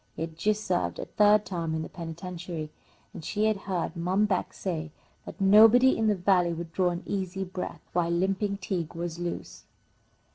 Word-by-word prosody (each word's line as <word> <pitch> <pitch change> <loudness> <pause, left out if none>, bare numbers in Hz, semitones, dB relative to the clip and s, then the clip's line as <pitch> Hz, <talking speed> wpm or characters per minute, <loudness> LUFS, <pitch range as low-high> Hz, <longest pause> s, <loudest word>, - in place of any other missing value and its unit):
He - - -3
had 165 -1 -6
just 210 +5 0
served 180 -2 0
a - - -4
third 210 0 +4
term 165 -4 -3
in 160 - -2
the - - -6
penitentiary, 170 -1 -6 0.4
and - - -9
she 210 +6 0
had 220 0 +3
heard 185 -1 -1
Mom 185 +5 +1
Beck 195 -3 -1
say 165 -4 -4 0.4
that - - -9
nobody 220 +6 +7
in 220 - +1
the 210 - +3
Valley 180 -2 +2
would 165 0 -6
draw 185 -2 +2
an 175 +1 -4
easy 190 -1 -3
breath 185 0 -6
while 170 -1 +1
Limping 195 +3 0
Tige 180 -4 -4
was 170 0 -4
loose. 175 0 -5
180 Hz, 185 wpm, -28 LUFS, 170-200 Hz, 0.4 s, nobody